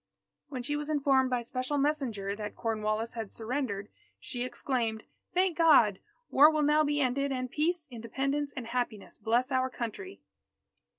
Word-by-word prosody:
When 255 -3 -5
she 290 +3 -1
was 295 +1 -3
informed 275 -3 +3
by 250 -2 0
special 255 +4 -2
messenger 260 -9 0
that 210 -1 -6
Cornwallis 220 0 -1
had 225 -3 -5
surrendered, 225 -4 -3 0.3
she 245 - -5
exclaimed: 235 -4 -2 0.3
"Thank 365 -1 +3
God! 240 - +6 0.3
war 295 +3 +8
will 310 -1 +1
now 300 +1 +4
be 295 0 0
ended, 275 +1 +1
and 255 -1 -3
peace, 320 +1 0
Independence, 275 +5 -2
and 250 - -4
happiness, 235 -3 -3
bless 235 +5 +1
our 260 0 +2
Country!" 255 - -6
255 Hz, 155 wpm, -30 LUFS, 230-290 Hz, 0.3 s, war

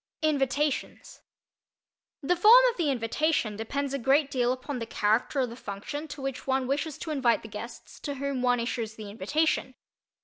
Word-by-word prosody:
INVITATIONS 290 -1 -1 1.0
The 355 +6 +2
form 445 +8 +8
of - - -15
the 330 -5 +1
invitation 245 -1 0
depends 275 +6 -3
a 275 - -1
great 275 +3 +3
deal 245 -2 +1
upon 255 +1 -4
the 230 - -5
character 220 +6 +1
of 250 -2 -1
the - - -8
function 245 +8 -6
to 290 -2 -8
which 270 -1 -4
one 265 -1 +1
wishes 280 +3 -2
to 320 - -5
invite 255 -6 +2
the - - -8
guests 215 +3 -9
to 285 -2 -4
whom 275 -1 -2
one 245 -1 +2
issues 230 -2 -3
the 210 -2 -8
invitation. 260 +6 0
270 Hz, 175 wpm, -28 LUFS, 235-290 Hz, 1.0 s, form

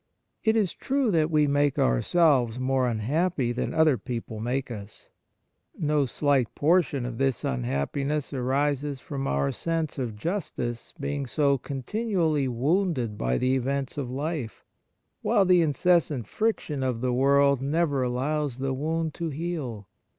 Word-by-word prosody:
It 220 -1 +3
is 210 -5 +1
true 270 -4 0
that 160 -3 +2
we 155 -2 +3
make 145 -1 +2
ourselves 125 - +3
more 130 0 +1
unhappy 130 +4 0
than 120 - -2
other 160 -6 +3
people 115 -1 -5
make 125 +3 -2
us. 105 -2 -9 0.7
No 150 -3 +1
slight 135 -1 +1
portion 150 -5 +2
of 120 -2 -5
this 135 -3 0
unhappiness 70 - -2
arises 140 +2 0
from 135 0 -4
our 70 0 +1
sense 165 -3 -2
of 120 -5 -3
justice 120 - -4
being 140 -1 -3
so 140 0 +2
continu 195 - -3
ally 155 -5 +2
wounded 130 - 0
by 60 -8 0
the 130 +1 +1
events 135 +1 -1
of 140 -4 -3
life, 140 - -4 0.6
while 200 - +3
the 180 -1 +5
incessant 155 -4 +2
friction 165 - -1
of 125 -3 -1
the 125 -1 0
world 140 +1 +4
never 145 0 +1
allows 130 +2 -1
the 135 0 -1
wound 160 +3 -2
to 170 +2 -3
heal. 145 - -4
140 Hz, 145 wpm, -26 LUFS, 125-155 Hz, 0.7 s, the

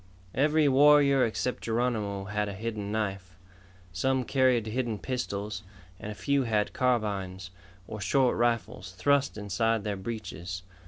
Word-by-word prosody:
Every 150 +2 +3
warrior 140 -1 +6
except 120 +2 -1
Geronimo 110 -4 -1
had 105 +1 -2
a 100 - -6
hidden 105 -1 -4
knife. 95 -4 -3 0.6
Some 130 +8 +1
carried 130 -3 +2
hidden 115 0 -2
pistols, 105 -4 -4 0.4
and 105 - -6
a - - -7
few 140 +4 +1
had 110 -4 0
carbines, 100 -7 -1 0.4
or 105 - -7
short 130 +3 +2
rifles, 115 -5 -1
thrust 140 +7 +1
inside 105 +2 0
their 105 -1 -2
breeches. 95 -4 -6
110 Hz, 130 wpm, -28 LUFS, 100-130 Hz, 0.6 s, warrior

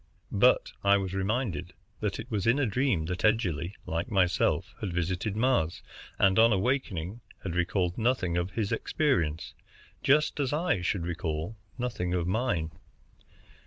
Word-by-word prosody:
But - - +4
I 100 0 +5
was 95 -1 -3
reminded 95 -2 -1 0.3
that 105 -2 -2
it 115 +3 -8
was 105 -1 -1
in 115 +4 +4
a 145 - +2
dream 115 - +1
that 90 +2 -4
Edgerly, 95 -5 +1
like 85 +7 -2
myself, 90 -4 +1
had 100 - -2
visited 90 +4 -1
Mars, 110 -9 +1 0.3
and 95 +1 +4
on 115 +1 +6
awaking 105 - -1 0.2
had 95 - -3
recalled 90 +1 0
nothing 115 -7 +1
of 90 +1 0
his 105 0 -2
experience, 85 - 0 0.5
just 150 +2 +3
as 140 -1 0
I 155 - +1
should 90 0 -1
recall 85 +2 -3 0.2
nothing 115 -8 -2
of 85 -2 0
mine. 90 -5 0
95 Hz, 150 wpm, -29 LUFS, 90-120 Hz, 0.5 s, on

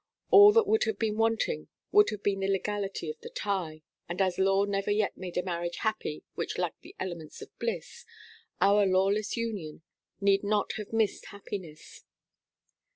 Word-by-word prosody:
All 405 +1 +10
that 455 -1 +5
would 440 +3 +2
have 445 - -2
been 220 -2 -1
wanting 225 - 0 0.2
would 415 0 +6
have 205 -1 -6
been 195 -1 +1
the 195 - -1
legality 195 0 -2
of 460 0 -14
the 470 - -8
tie: 185 - -3 0.3
and 175 - -4
as 185 -2 +1
law 195 +1 +3
never 200 0 -2
yet 205 0 +1
made 180 -2 -7
a 180 - +1
marriage 175 -1 -3
happy 215 -8 -2
which - - -4
lacked - - -3
the 365 +4 -14
elements 170 -4 -6
of - - -12
bliss, - - -4 0.6
our 200 +1 +4
lawless 195 +4 +1
union 200 -10 -4 0.4
need 200 0 +3
not 205 0 +1
have 210 -2 -7
missed 225 -3 0
happiness. 190 -6 -9
200 Hz, 170 wpm, -29 LUFS, 185-225 Hz, 0.6 s, All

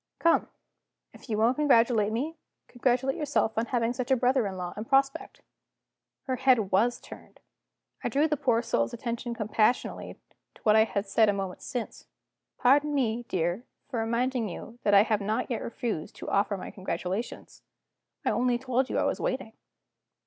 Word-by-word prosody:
Come! 335 - +3 0.7
if - - -15
you 215 - 0
won't 230 +4 +3
congratulate 230 -7 +3
me, 285 +9 -2 0.3
congratulate 255 +2 0
yourself 265 -7 0
on 225 +2 0
having 240 -1 0
such 250 -1 -4
a 265 - +5
brother 250 -2 +2
in 190 -1 -6
law 180 -1 -4
in 215 - -4
prospect!" 275 +1 0 0.8
Her 260 -2 -2
head 245 -7 +3
was 230 +6 +2
turned. - - -13 0.6
I - - 0
drew 290 +3 +2
the 300 - +1
poor 240 -4 +1
soul's 240 0 0
attention 235 0 -4
compassionately 215 +2 0 0.4
to - - -20
what 215 -1 +5
I 220 0 +6
had 200 -2 -2
said 215 +2 +3
a - - +3
moment 195 -2 -4
since. 245 -3 -6 0.5
"Pardon 290 +3 +3
me, 240 -3 0
dear, 175 +5 -1 0.3
for 245 -4 -2
reminding 235 0 0
you 230 +7 -9
that 205 -1 +3
I 200 - +8
have 215 -1 0
not 215 +6 -1
yet 230 - -1
refused 230 - -4
to - - -7
offer 200 0 +1
my - - -7
congratulations. 190 +3 -5 0.6
I - - +3
only 245 0 +1
told 255 +1 0
you - - -1
I - - +2
was - - 0
waiting." 255 -4 -3
235 Hz, 175 wpm, -28 LUFS, 215-255 Hz, 0.8 s, I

